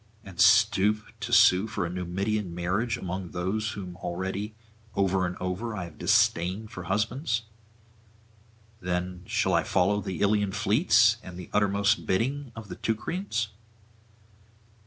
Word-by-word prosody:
and 95 -3 -4
stoop 105 +2 +4
to - - -5
sue 95 +4 +6
for 100 -4 -2
a - - -3
Numidian 90 +1 -2
marriage 100 +7 -1
among 95 0 -5
those 105 +6 -2
whom 90 -3 -7
already 95 +4 -4 0.4
over 95 -1 +2
and 90 - -6
over 95 +5 -3
I 95 - -4
have 85 -3 -11
disdained 95 +6 +2
for 90 -6 -7
husbands? 115 - -1 1.4
Then 90 0 -3
shall - - +1
I - - +4
follow 100 +3 +1
the 95 -4 -5
Ilian 100 -1 +2
fleets 110 - +4
and 90 -1 -10
the 90 - -9
uttermost 100 +1 +2
bidding 130 +7 -1
of 110 -2 -8
the - - -8
Teucrians? 115 - -2
100 Hz, 135 wpm, -27 LUFS, 90-110 Hz, 1.4 s, sue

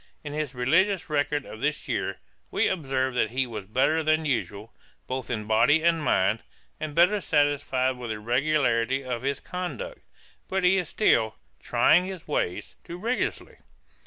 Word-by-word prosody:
In 145 -1 -6
his 150 -3 -3
religious 170 +8 +2
record 145 -1 0
of 110 - -10
this 150 0 -1
year, - - -2 0.3
we - - +1
observe 135 -6 -1
that 120 -3 +1
he 130 +3 0
was 110 -5 -7
better 130 +10 +2
than 155 0 +1
usual, 115 -5 -3 0.3
both 130 0 -4
in 110 -4 -2
body 115 +9 +4
and 165 -1 +3
mind, 105 -3 +2 0.4
and 155 -2 -5
better 195 +5 +4
satisfied 140 -4 +1
with 120 -2 -6
the 110 - -3
regularity 130 +1 +1
of 125 -2 -3
his 140 +1 -1
conduct. 475 - -6 0.5
But 190 0 -1
he 180 +2 +5
is 175 -3 -4
still 110 - +2 0.2
'trying 180 +3 +3
his 190 -3 -8
ways' 90 - -2
too 170 - -8
rigorously. 230 +7 -2
145 Hz, 160 wpm, -26 LUFS, 125-165 Hz, 0.5 s, he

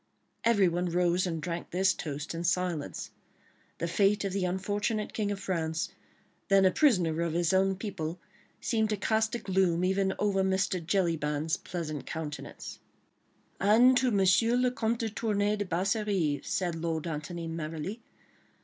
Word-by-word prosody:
Everyone 185 -6 +3
rose 180 +1 +2
and 165 -2 -2
drank 170 +1 -4
this 185 +1 +2
toast 150 -1 -5
in 165 +1 -4
silence. 170 - -1 0.7
The 170 - -2
fate 200 +3 +2
of 195 - -2
the 195 -2 0
unfortunate 205 +4 -1
King 210 -2 -1
of 200 -1 -3
France, 165 -4 -2 0.6
then 195 -1 +5
a 185 - +5
prisoner 180 - +3
of 170 -2 -1
his 170 +1 +1
own 190 0 +3
people, 185 -4 -5 0.4
seemed 220 -3 0
to 210 - 0
cast 220 +3 +1
a - - 0
gloom 185 -5 +1
even 190 +1 +1
over 200 -2 +1
Mr. 190 -1 0
Jellyband's 160 -4 0
pleasant 155 -6 -5
countenance. 155 -2 -6 0.8
"And 230 +6 +6
to 255 0 +2
M. 220 -5 +2 0.5
le 250 - +3
Comte 230 -2 -1
de 225 - -1
Tournay 210 -1 0
de 205 - -2
Basserive," 185 -4 0
said 180 -2 -1
Lord 165 -1 -2
Antony, 165 +1 -4
merrily. 165 +6 -5
185 Hz, 150 wpm, -29 LUFS, 165-205 Hz, 0.8 s, And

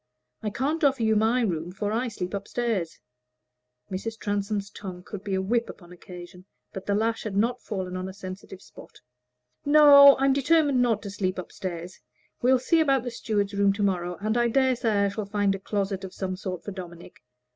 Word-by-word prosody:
I 215 - -2
can't 290 - -2
offer 270 -4 +3
you 220 0 +3
my 225 +4 +2
room, 175 -6 -2
for 205 +2 -3
I 235 +4 0
sleep 185 -5 -5
up 200 0 -4
stairs." 225 -9 -2 0.9
(Mrs. 220 +4 -4
Transome's 205 -1 -2
tongue 185 -3 -8
could 200 0 -8
be 195 -2 -2
a 190 - 0
whip 235 +4 0
upon 175 -2 -12
occasion, 180 0 -12 0.3
but 195 - -8
the 200 - +1
lash 225 +2 0
had 205 -3 -4
not 235 +4 +1
fallen 185 -4 -5
on 185 +1 -4
a - - -9
sensitive 190 0 -9
spot.) - - -15 0.6
"No; 285 -1 +8
I'm 270 0 +3
determined 285 -1 +3
not 230 -4 +1
to 200 - -6
sleep 185 -2 -2
up 185 - -7
stairs. 175 -2 -6 0.4
We'll 255 +2 +4
see 325 +7 +2
about 275 -5 +2
the 245 - -4
steward's 205 -3 -2
room 200 0 +3
to 205 +1 -2
morrow, 180 -3 -1
and 215 +2 -1
I 240 0 +3
dare 260 +2 +2
say 215 -4 +1
I - - +1
shall 205 +1 -4
find 205 -1 +1
a 195 - -5
closet 195 -1 -3
of 190 - -8
some 185 -1 -3
sort 185 -2 -6
for 205 - -6
Dominic. 175 -2 -10
205 Hz, 205 wpm, -26 LUFS, 190-240 Hz, 0.9 s, No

